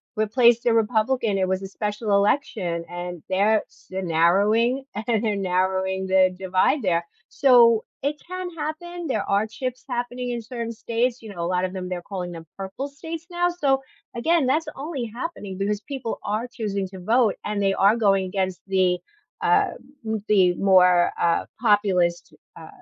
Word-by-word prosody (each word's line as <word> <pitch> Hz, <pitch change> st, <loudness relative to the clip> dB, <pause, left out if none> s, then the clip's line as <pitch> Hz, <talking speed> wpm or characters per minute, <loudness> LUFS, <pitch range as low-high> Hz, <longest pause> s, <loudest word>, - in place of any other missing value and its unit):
replaced 235 Hz, +2 st, +3 dB
a 230 Hz, -, +5 dB
Republican, 220 Hz, -1 st, +1 dB
it 185 Hz, -, +1 dB
was 190 Hz, +1 st, -1 dB
a -, -, -4 dB
special 210 Hz, +2 st, -3 dB
election, 200 Hz, -5 st, +1 dB
and 175 Hz, -1 st, -6 dB
they 190 Hz, +1 st, 0 dB
are 215 Hz, +1 st, +3 dB
sh -, -, -25 dB
they're 190 Hz, 0 st, -4 dB
narrowing 205 Hz, +10 st, +3 dB, 0.2 s
and 215 Hz, -3 st, 0 dB
narrowing 190 Hz, +1 st, 0 dB
the 190 Hz, 0 st, +4 dB
divide 190 Hz, +8 st, +1 dB
there. 170 Hz, -2 st, +1 dB, 0.3 s
So, 235 Hz, -4 st, +5 dB, 0.2 s
it 295 Hz, +1 st, -2 dB
can 365 Hz, 0 st, -5 dB
happen, 340 Hz, +2 st, -5 dB
there 215 Hz, -6 st, -1 dB
are 200 Hz, +2 st, +2 dB
chips 255 Hz, +2 st, -5 dB
happening 245 Hz, 0 st, -3 dB
in 235 Hz, -1 st, -3 dB
certain 230 Hz, -1 st, -5 dB
states, 235 Hz, +2 st, -1 dB
you 210 Hz, -2 st, -8 dB
know, 175 Hz, -, -11 dB
a 170 Hz, -, -1 dB
lot 180 Hz, 0 st, 0 dB
of 185 Hz, -, -4 dB
them, 185 Hz, -1 st, -5 dB
they're 180 Hz, -1 st, -3 dB
calling 180 Hz, -2 st, -5 dB
them 165 Hz, -1 st, -9 dB
purple 195 Hz, +9 st, -5 dB
states 325 Hz, +3 st, -7 dB
now, 350 Hz, 0 st, +1 dB
so, 275 Hz, -6 st, +1 dB, 0.3 s
again, 320 Hz, +4 st, +2 dB
that's 305 Hz, +5 st, +1 dB
only 275 Hz, -3 st, -4 dB
happening 225 Hz, -, -6 dB
because 205 Hz, +1 st, -1 dB
people 265 Hz, -4 st, -5 dB
are 215 Hz, +4 st, -1 dB
choosing 205 Hz, -5 st, -3 dB
to 190 Hz, -1 st, -10 dB
vote, 225 Hz, +2 st, +3 dB
and 210 Hz, -1 st, -2 dB
they 195 Hz, 0 st, +2 dB
are 200 Hz, +4 st, +4 dB
going 195 Hz, -4 st, +2 dB
against 185 Hz, -1 st, -2 dB
the 185 Hz, -2 st, +2 dB, 0.4 s
uh, -, -, +3 dB, 0.3 s
mm, 220 Hz, -1 st, -2 dB
the 185 Hz, -4 st, +5 dB
more, 180 Hz, -2 st, +4 dB
uh, 170 Hz, -1 st, +2 dB, 0.2 s
populist, 195 Hz, -6 st, +2 dB, 0.2 s
uh, -, -, -10 dB
210 Hz, 175 wpm, -24 LUFS, 190-245 Hz, 0.4 s, a